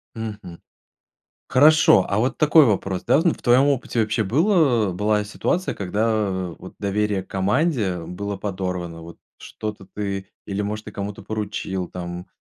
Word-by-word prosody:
Мгм. 105 -6 -7 0.9
Хорошо, 150 -7 +6
а 100 - 0
вот 125 +4 0
такой 155 0 +6
вопрос, 95 -5 -1
да: - - +4
ну 170 - +4
в - - -18
твоем 125 +2 +5
опыте 130 -4 0
вообще 110 +1 +1
было 130 - +2
была 105 +2 +1
ситуация, 180 - -1
когда 100 -2 -1
вот 95 - -11
доверие 100 -1 0
к - - -22
команде 100 - 0
было 100 +3 -5
подорвано? 90 -4 -4
Вот 85 0 -11 0.2
что-то 105 -3 -7
ты, 100 -1 -4 0.2
или 100 +1 -2
может 105 +1 -4
ты - - -9
кому-то 100 0 -5
поручил 100 -4 -4
там, 90 0 -6
105 Hz, 150 wpm, -22 LUFS, 95-115 Hz, 0.9 s, Хорошо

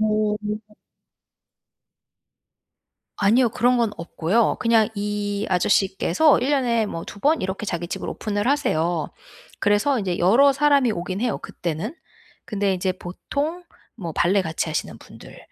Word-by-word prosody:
어. 215 -1 +1 2.8
아니요. 230 +5 +4
그런 245 +3 +2
건 230 -3 +2
없고요. 175 +6 0
그냥 230 -2 +3
이 205 0 -2
아저씨께서 190 - +3
1 260 +3 -1
년에 240 -5 +2
뭐 165 -4 -5
2 205 - -10
번 305 +7 +2
이렇게 190 +2 -3
자기 175 -3 -3
집을 - - -5
오픈을 205 0 -3
하세요. 175 - 0 0.5
그래서 220 +7 +2
인제 185 -4 -2
여러 245 +11 +5
사람이 280 -4 +3
오긴 185 +1 -4
해요 235 -3 -1
그때는. 175 - -5 0.5
근데 200 -2 0
이제 185 0 -1
보통 285 - -4 0.3
뭐 170 -4 -6
발레 190 +5 +2
같이 160 -1 -3
하시는 155 - -3
분들 - - -14
205 Hz, 265 characters per minute, -23 LUFS, 185-245 Hz, 2.8 s, 여러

